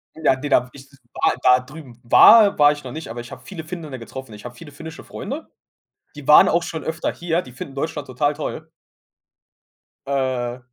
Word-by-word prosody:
Ja, 155 -4 +2
ne, 145 +2 -6
da 125 -2 +3
w - - -18
ich 140 -1 -14 0.3
war - - +1
da 125 0 +6
drüben 130 -2 -13
war 205 - +7
war 145 0 +6
ich 145 -1 -6
noch 125 - -8
nicht, 155 -5 -8
aber 120 +1 -6
ich 120 - -13
habe - - -10
viele 165 -5 -8
Finnen 155 -6 -8
getroffen. 130 0 -10
Ich 105 - -12
habe 120 0 -8
viele 145 +3 -12
finnische 160 +2 -10
Freunde. 295 +5 -7 0.7
Die 145 - -10
waren 150 - +8
auch 170 +1 +1
schon 160 -2 -6
öfter 160 0 -3
hier, 175 +1 -2
die 125 - -14
finden 135 +2 -9
Deutschland 150 0 -4
total 145 +3 -1
toll. 160 +2 -6 1.4
Äh, 130 -3 -2
145 Hz, 200 wpm, -21 LUFS, 125-160 Hz, 1.4 s, waren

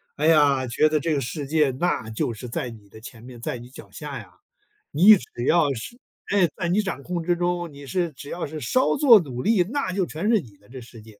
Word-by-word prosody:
哎 150 +2 0
呀， 145 -5 +4
觉 125 +6 +2
得 155 0 +1
这 160 +2 -1
个 145 - 0
世 140 +3 -5
界 150 -1 +2
那 130 -4 -2
就 110 +2 -2
是 115 +3 -9
在 120 +1 -4
你 110 -3 -13
的 110 - -14
前 115 0 -11
面、 120 -1 -12
在 120 - -4
你 120 +1 -12
脚 130 - -13
下 - - -7
呀， - - -11 0.6
你 195 +8 +7
只 120 -4 -8
要 155 -3 +3
是 135 - -8 0.3
哎， 195 -3 +3
在 170 -2 -3
你 195 +5 +2
掌 195 -8 -5
控 175 +2 -3
之 175 +1 +1
中， 175 -1 -2
你 140 0 -11
是 170 +4 -2
只 140 +2 -11
要 175 - -4
是 155 +1 -7
稍 255 - +1
做 255 -7 +7
努 130 -8 -5
力， 205 - +3
那 220 0 -3
就 185 0 0
全 170 +6 -3
是 225 -2 +4
你 115 - -13
的， 100 - -25
这 130 +1 -9
世 115 -1 -13
界。 110 -1 -17
150 Hz, 270 characters per minute, -24 LUFS, 125-175 Hz, 0.6 s, 你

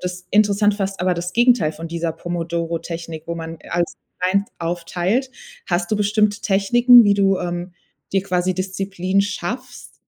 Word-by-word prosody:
das 180 0 -6
interessant 205 0 +3
fast 195 -2 -3
aber 180 0 +1
das 175 +1 -4
Gegenteil 240 -8 +4
von 160 +2 -8
dieser 170 0 -2
Pomodoro-Technik, 165 -1 -4
wo 170 - -3
man 165 0 -7
als 175 0 -1 0.2
eins 195 +3 +1
aufteilt. 175 +8 -1 0.4
Hast 175 0 -1
du - - +2
bestimmte 210 0 +1
Techniken, 240 +5 +6
wie 205 -1 +4
du, 195 -1 +2
ähm, 175 +1 -4 0.4
dir 195 - +2
quasi 185 -1 0
Disziplin 190 0 -1
schaffst? 205 +5 -5
185 Hz, 150 wpm, -21 LUFS, 170-205 Hz, 0.4 s, Techniken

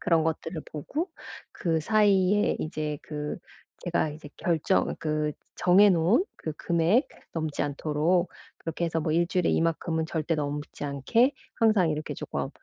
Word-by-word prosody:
그런 165 -3 +2
것들을 160 0 -2
보고 295 - -3 0.4
그 165 -5 0
사이에 205 0 +3
이제 155 -2 -3
그 150 -1 -5 0.5
제가 170 -3 +1
이제 150 0 -10
결정 170 +2 +1
그 155 -1 0 0.2
정해 200 +3 +6
놓은 185 - +3
그 155 - -5
금액 170 - +2 0.2
넘지 155 -3 -2
않도록 155 +5 +1 0.3
그렇게 165 +1 -3
해서 165 -1 0
뭐 155 -1 -1
1 170 +1 +3
주일에 180 -2 +1
이만큼은 165 -1 0
절대 160 0 -1
넘지 145 0 -4
않게 185 - +2 0.2
항상 215 -7 +4
이렇게 155 0 -3
조금 - - -4
165 Hz, 280 characters per minute, -27 LUFS, 155-185 Hz, 0.5 s, 정해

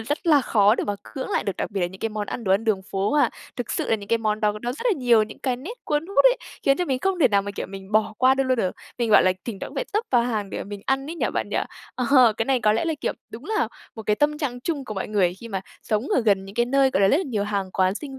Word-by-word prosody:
rất 290 +9 -3
là 300 -4 +6
khó 210 -4 +4
để - - -2
mà 205 - -1
cưỡng 110 -1 -6
lại - - 0
được, 200 - -2
đặc - - -3
biệt 200 -2 -3
là 175 - +2
những 190 +2 -11
cái 225 - 0
món 210 -1 -4
ăn, 235 - -5
đồ 190 - +2
ăn 200 +4 +2
đường 205 -4 +1
phố 195 +1 -2
ha. 295 -1 +3 0.3
Thực 245 -4 -4
sự - - -2
là 225 - +4
những 200 -1 -11
cái 230 +1 +2
món 215 -1 -1
đó 210 -1 +2
nó 240 +1 -2
rất 285 - -8
là 475 - +4
nhiều 240 -3 +5
những 215 0 -7
cái 255 -2 -1
nét 320 - -7
cuốn 300 +2 -1
hút 395 - +2
ấy, - - +6 0.3
khiến 275 0 +3
cho 360 - 0
mình 265 -6 -1
không 385 +5 0
thể 265 - +6
nào 200 -2 +2
mà 200 - -5
kiểu 200 - -5
mình 195 +1 -10
bỏ 215 0 +2
qua 255 +1 +5
được 270 0 +1
luôn 260 -1 +1
được. 185 -5 +1 0.3
Mình, 235 -2 0
gọi - - +7
là, 185 - +4
thỉnh 225 -5 -5
thoảng - - -5
cũng - - -13
phải - - -1
tấp 425 - +2
vào 245 -2 +4
hàng 215 -5 -2
để - - -4
mình 200 0 -7
ăn 270 +1 0
ấy - - -5
nhỉ - - 0
bạn - - -2
nhỉ? - - -2 0.4
Ờ, 250 -2 +5
cái 225 - 0
này 260 0 +1
có 215 -1 +4
lẽ 220 - 0
là 325 -1 0
kiểu - - -1 0.2
đúng 235 +5 -9
là 430 +4 0 0.3
một 220 - -7
cái 210 0 +1
tâm 300 +3 +1
trạng 250 -5 -3
chung 285 0 -3
của 215 - -6
mọi 195 - -4
người 190 -4 +2
khi 230 - -8
mà 195 -3 -3 0.2
sống 215 +4 -1
ở - - +2
gần 200 -4 +2
những 195 +1 -11
cái 240 +1 +2
nơi, 270 +1 +3
gọi 195 - +1
là, 195 - +5
rất 280 - +4
là 355 - 0
nhiều 215 -6 -1
hàng 200 -2 -2
quán 185 0 +1
sinh 270 +2 -7
225 Hz, 335 wpm, -24 LUFS, 205-270 Hz, 0.4 s, gọi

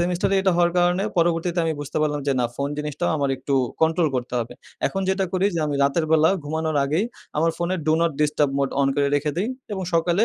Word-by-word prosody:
Semester 175 +2 0
এ - - +4
এটা 190 -2 +3
হওয়ার 175 0 +3
কারণে 175 +3 +2
পরবর্তীতে 170 +1 +1
আমি 160 - 0
বুঝতে 145 - -6
পারলাম 145 -1 0
যে, 140 - +3
না 120 - +2
ফোন 140 0 -1
জিনিসটাও 150 +3 -2
আমার 140 -2 0
একটু 140 +1 -2 0.3
কন্ট্রোল 160 0 +3
করতে 125 0 -4
হবে। 115 - -6 0.3
এখন 195 - -2
যেটা 190 0 +1
করি 190 +1 +2
যে 165 - 0
আমি 145 - -2
রাতের 155 +4 +1
বেলা 160 +2 +5
ঘুমানোর 155 0 -2
আগেই 155 +9 0 0.3
আমার 165 +1 +3
ফোনে 175 +2 -1
do 155 - +4
not 170 -2 +2
disturb 150 -1 +2
mode 140 -1 0
on 135 - +3
করে 140 -1 +2
রেখে 150 +1 -1
দেই। 205 +6 0 0.2
এবং 190 - -3
সকালে 175 +6 +3
160 Hz, 230 wpm, -23 LUFS, 145-175 Hz, 0.3 s, বেলা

